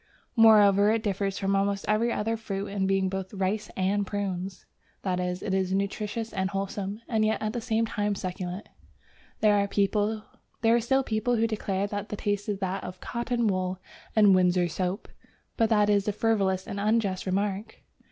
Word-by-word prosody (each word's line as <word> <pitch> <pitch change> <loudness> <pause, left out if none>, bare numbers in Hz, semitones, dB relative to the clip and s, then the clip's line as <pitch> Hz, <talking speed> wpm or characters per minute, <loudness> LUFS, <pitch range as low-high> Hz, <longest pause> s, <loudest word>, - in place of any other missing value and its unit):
Moreover, 210 -3 +6
it 220 0 +1
differs 195 -1 -1
from 195 0 0
almost 200 0 0
every 220 +3 +2
other 225 +1 -1
fruit 200 -3 -4
in 195 -1 -1
being 195 0 +2
both 190 0 -4
"rice 195 +2 -1
and 195 +2 +1
prunes," 195 -2 -4 0.4
that 185 -2 0
is, 180 0 -2
it 195 - -2
is 190 -1 0
nutritious 210 +3 -2
and 190 -2 -1
wholesome, 200 +1 -4
and 220 -2 +1
yet 215 0 +1
at 215 0 -2
the 240 - -3
same 225 -1 +1
time 205 -2 -1
succulent. 185 +1 -5 0.7
There 215 -1 +5
are 210 +3 0
still 265 +4 +2
people 230 +1 0
who 225 0 +2
declare 200 -3 -1
that 205 0 -4
the - - -3
taste 205 0 -2
is 205 - -1
that 190 0 -2
of 180 0 -7
"cotton 235 0 -2
wool 185 -2 0 0.4
and 210 -3 +6
Windsor 180 -1 +3
soap," 185 +4 -3 0.5
but 225 -1 +2
that 210 -2 +4
is 205 -1 +2
a 210 - +1
frivolous 195 -4 +1
and 200 - -5
unjust 205 -3 0
remark. 200 +3 -2
200 Hz, 175 wpm, -27 LUFS, 190-215 Hz, 0.7 s, Moreover